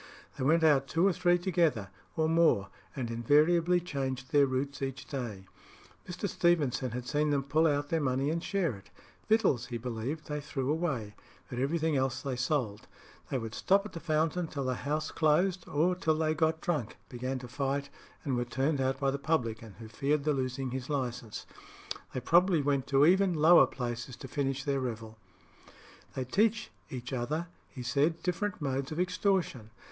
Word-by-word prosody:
They - - -4
went 160 +4 +3
out 140 -4 +4
two 165 +7 +2
or 195 - +4
three 175 0 +3
together, 165 - +1 0.3
or 160 0 +2
more, 160 -12 +3 0.3
and 120 -4 -3
invariably 160 +9 +3
changed 135 -6 -4
their 145 -2 +5
routes 135 +2 -2
each 135 -2 -4
day. 115 -9 -5 0.6
Mr. 180 +3 -3
Stevenson 155 -9 +1
had 125 +1 -5
seen 150 +1 +1
them 140 -2 +1
pull 155 +4 +3
out 145 -1 0
their 165 -1 +1
money 135 +1 +1
and 165 +1 -2
share 190 -7 0
it. 100 - -15 0.4
Victuals, 195 - +3
he 120 - -4
believed, 125 +6 -4
they 150 0 -4
threw 135 -1 -2
away; 140 -11 -2 0.4
but 125 - -3
everything 160 +3 +1
else 130 -1 0
they 135 -3 -2
sold. 125 -5 -1 0.4
They 135 - 0
would 115 -3 -5
stop 195 +8 +2
at 210 - -8
the 165 - -5
Fountain 160 +2 0
till 140 -3 -4
the 130 0 0
house 150 +5 -2
closed, 175 +4 +2
or 165 +5 +2
till 160 -4 0
they 155 0 +1
got 160 0 +1
drunk, 150 -11 -2
began 130 +2 -4
to 125 -1 -8
fight, 140 +2 -2 0.3
and 135 -3 -1
were 120 - 0
turned 135 +4 0
out 130 0 0
by 135 -1 +1
the 140 - -3
publican, 115 -8 -2
who 115 - -9
feared 140 +7 0
the 150 0 +2
losing 130 -1 -2
his 130 +1 -5
licence. 120 -6 -3 0.7
They 130 - -4
probably 170 +2 +4
went 140 -2 0
to 140 +1 +5
even 185 +1 +4
lower 160 +3 +7
places 120 0 -5
to 135 - -9
finish 135 0 -2
their 140 -1 0
revel. 110 -3 -5 1.0
"They 130 - -2
teach 215 - +1 0.4
other," 150 +8 -2 0.2
he 130 -5 -8
said, 145 +7 +1
"different 185 +3 -1
modes 135 -2 -2
of 155 - -4
extortion. 180 - 0
140 Hz, 180 wpm, -30 LUFS, 130-165 Hz, 1.0 s, lower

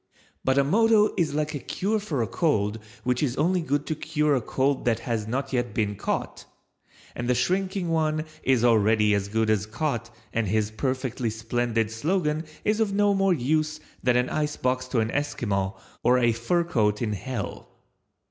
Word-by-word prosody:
But 130 +1 +2
a 140 - +5
motto 215 +6 +4
is 155 -5 0
like 150 0 -1
a 145 - -3
cure 210 +10 -1
for 155 - -1
a - - -2
cold 110 - 0 0.2
which 125 0 0
is 135 -4 0
only 175 +4 +2
good 145 -2 -1
to 160 - -1
cure 150 -1 0
a 130 - +2
cold 135 +3 0
that 115 -1 +1
has 115 -3 -2
not 130 +4 -2
yet 120 -3 -1
been 105 -2 0
caught, - - -3 0.7
and 120 0 -3
the 125 - +3
shrinking 185 +6 0
one 155 -1 +1 0.2
is 130 -3 +2
already 110 -2 +4
as 100 -1 0
good 110 +1 +1
as 105 -1 0
caught 120 0 -2 0.2
and 115 -2 0
his 105 +2 0
perfectly 130 0 -2
splendid 115 0 -1
slogan 155 +5 0 0.2
is 210 +1 +2
of 220 -3 +1
no 205 0 +3
more 195 -2 +3
use 155 +3 0 0.2
than 125 -1 +3
an 125 0 +1
icebox 130 -4 -1
to 125 -3 +1
an 110 0 -1
Esquimaux 100 -9 -1 0.2
or 125 +2 +4
a 120 -2 +3
fur 120 +10 +1
coat 105 -10 +1
in 105 -2 -1
Hell. 115 0 -5
130 Hz, 185 wpm, -26 LUFS, 115-155 Hz, 0.7 s, a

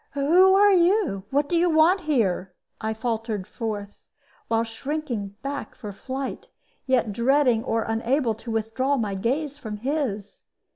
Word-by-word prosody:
"Who 350 +7 +5
are 405 0 +6
you? 345 - +2
What 285 +3 +1
do 345 - 0
you 345 +1 +3
want 330 +4 +4
here?" 195 - 0 0.3
I 220 - -1
faltered 220 -3 -3
forth, 205 -3 -6 0.5
while 225 0 +1
shrinking 230 -3 -4
back 280 +1 -5
for 210 - -7
flight, 265 +6 -6 0.4
yet 245 -5 +1
dreading 245 0 +3
or 225 -3 0
unable 230 +2 0
to 225 +2 -10
withdraw 225 +5 0
my 210 -5 -1
gaze 275 +9 -2
from 215 -5 -6
his. 230 -5 -3
245 Hz, 145 wpm, -24 LUFS, 220-295 Hz, 0.5 s, are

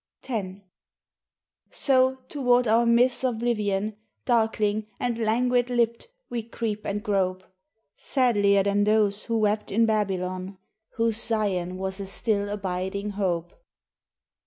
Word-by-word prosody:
X 200 -6 -4 1.1
"So, 260 - +2
toward 250 -4 +2
our 230 +2 +3
myth's 245 +2 +3
oblivion, 215 -4 -1 0.3
Darkling, 220 -3 +1
and 235 -2 -1
languid 245 +2 +1
lipped, 235 - 0 0.2
we 240 -1 -3
creep 220 -2 -4
and 205 +1 -2
grope 185 -2 0 0.5
Sadlier 205 -7 +2
than 200 +1 +2
those 210 -1 +2
who 230 -1 0
wept 210 0 0
in 230 +3 +3
Babylon, 190 -3 -2 0.4
Whose 230 -1 +1
Zion 190 -5 -1
was 190 +1 -4
a 195 - -5
still 205 0 -1
abiding 195 0 -3
hope. 180 -4 -2
215 Hz, 115 wpm, -26 LUFS, 200-235 Hz, 1.1 s, our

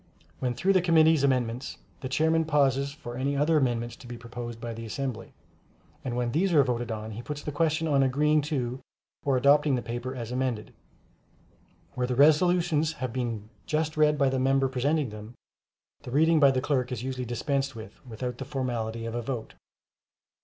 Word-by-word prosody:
When 125 -2 -1
through 185 +11 -1
with 195 - +6
the - - +3
committee's 160 -3 +4
amendments, 125 -2 0 0.2
the 130 - -5
Chairman 160 +4 +2
pauses 140 -2 +2
for 120 -4 -8
any 140 +2 -1
other 150 +3 +3
amendments 120 -4 0
to 125 - -13
be 120 0 -7
proposed 120 0 -7
by 115 0 -5
the 115 +1 -7
assembly; 120 +1 -5 0.7
and 125 -2 -3
when 120 -1 -1
these 180 +6 +1
are 145 -3 +6
voted 120 -2 -2
on, 110 0 -5
he 110 +2 -6
puts 150 +3 -6
the 150 - -3
question 160 +2 +1
on 140 -3 +3
agreeing 150 +3 +3
to 130 -4 -2 0.4
or 135 -2 +2
adopting 140 +1 +4
the 125 - -3
paper 120 +2 -4
as 120 -2 -6
amended. 125 -4 -2 1.2
Where 125 -1 -1
the 125 - -1
resolutions 160 +2 +4
have 130 -6 -4
been 115 -4 -3 0.2
just 155 0 -1
read 150 -1 +3
by 140 -1 +3
the 130 0 -1
member 135 +1 +3
presenting 135 +2 0
them, 105 +3 -10 0.7
the - - -9
reading 160 +5 +4
by 140 -2 +7
the 130 -1 +1
clerk 130 -3 0
is 125 -2 -4
usually 130 -1 -3
dispensed 135 +3 -1
with 110 -2 -11
without 125 +1 -5
the 135 - -4
formality 120 -4 -3
of 115 - -4
a 120 - -2
vote. 115 -2 -5
130 Hz, 190 wpm, -27 LUFS, 120-150 Hz, 1.2 s, by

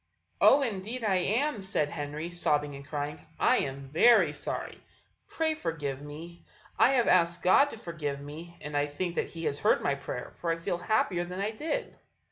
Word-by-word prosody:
"Oh, 280 +1 +7
indeed 225 +1 -4
I 195 -3 +2
am!" 225 +6 0
said 170 -6 0
Henry, 150 +4 -5
sobbing 150 -4 +1
and 140 0 -9
crying; 145 0 -4 0.2
"I - - +4
am 135 0 -3
very 165 - +5
sorry, - - -5 0.4
pray 320 -1 0
forgive 150 - -4
me. 160 +4 -10 0.4
I 265 - +6
have 245 -3 +3
asked 170 -1 +3
God 275 +10 +5
to 225 - -8
forgive 155 -8 -4
me; 160 +4 -9
and 150 0 -6
I 145 0 +2
think 170 +4 -3
that - - -2
He 165 -1 -7
has 140 - -1
heard - - +3
my 140 - +2
prayer, 140 -3 -6
for 170 - -5
I 165 - 0
feel 170 +1 -3
happier 180 -2 +1
than 180 +2 -6
I 205 +2 -1
did." 325 - -3
170 Hz, 190 wpm, -29 LUFS, 145-205 Hz, 0.4 s, Oh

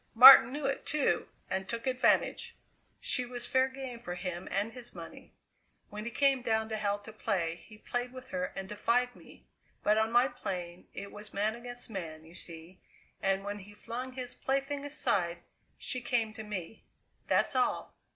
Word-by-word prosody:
Martin 250 0 +12
knew 290 +1 -3
it, 275 0 0
too, 280 - +1 0.2
and 190 0 -2
took 230 +1 -3
advantage. 255 -1 +2 0.4
She 250 - +1
was 245 -1 -4
fair 260 0 +3
game 260 -2 -7
for 175 -6 -5
him 180 -1 -4
and 205 +3 -1
his 245 -1 -9
money. - - -10 0.6
When 210 +1 -6
he - - -1
came 275 +1 +3
down 220 -2 +1
to 220 - -1
hell 205 -1 0
to 205 +2 -11
play, 170 -6 -1
he 215 - -13
played 245 +3 -3
with 255 0 -10
her 275 0 -1
and 195 0 -4
defied 240 +4 +1
me. - - -16 0.4
But 210 +1 +4
on 220 +1 +1
my 240 +2 +5
plane 180 -7 -5
it 200 +1 -6
was 210 0 -10
man 210 +2 +1
against 245 +1 -8
man, 165 -7 -6
you 165 - -15
see, 170 +1 -9 0.4
and 195 0 +1
when 205 +1 -4
he 205 +1 -13
flung 245 +4 -5
his 250 -1 -5
plaything 275 +1 -1
aside, 180 - 0 0.3
she 255 - -2
came 235 -3 0
to 220 - -7
me; 210 -2 -6 0.4
that's - - +2
all! 255 -1 +1
225 Hz, 180 wpm, -32 LUFS, 195-250 Hz, 0.6 s, Martin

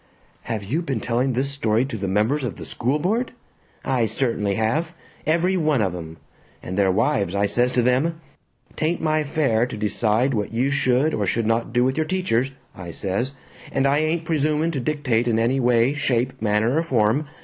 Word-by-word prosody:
"Have 110 -3 -3
you 135 - -1
been 135 -9 -2
telling 120 +4 0
this 135 +3 -1
story 115 -3 +1
to 135 - -6
the 100 -2 -3
members 110 +10 +1
of 125 - -3
the - - -9
school 125 +5 -1
board?" 220 +12 -1 0.5
"I 125 -4 +1
certainly 110 -3 -1
have! 135 - 0 0.3
Every 170 +4 +2
one 155 -5 +2
of 95 -4 0
'em! 80 -2 -8 0.5
And 90 - -5
their 100 -1 +3
wives 100 -3 +1
I 100 +1 +2
says 120 +5 +1
to 125 - +2
them, 140 +7 +1 0.6
''Tain't 160 +3 0
my 155 -1 +1
affair 140 -6 +1
to 125 - -7
decide 110 +4 +1
what 105 -3 -2
you 125 +5 0
should 140 +2 +2
or 100 -2 -1
should 115 +4 0
not 115 +2 0
do 120 +1 +2
with 130 +1 0
your 155 -1 0
teachers,' 155 -10 0 0.3
I 90 -1 -8
says, 100 - -2 0.4
'and 135 - +1
I 140 +2 +3
ain't 160 +1 0
presuming 155 +1 +1
to 145 - -2
dictate 125 -4 0
in 115 -2 +2
any 120 +4 +2
way, 120 +1 +3
shape, 130 -4 -1
manner, 110 +5 +1
or - - +3
form. 130 -1 +1
125 Hz, 195 wpm, -23 LUFS, 110-150 Hz, 0.6 s, their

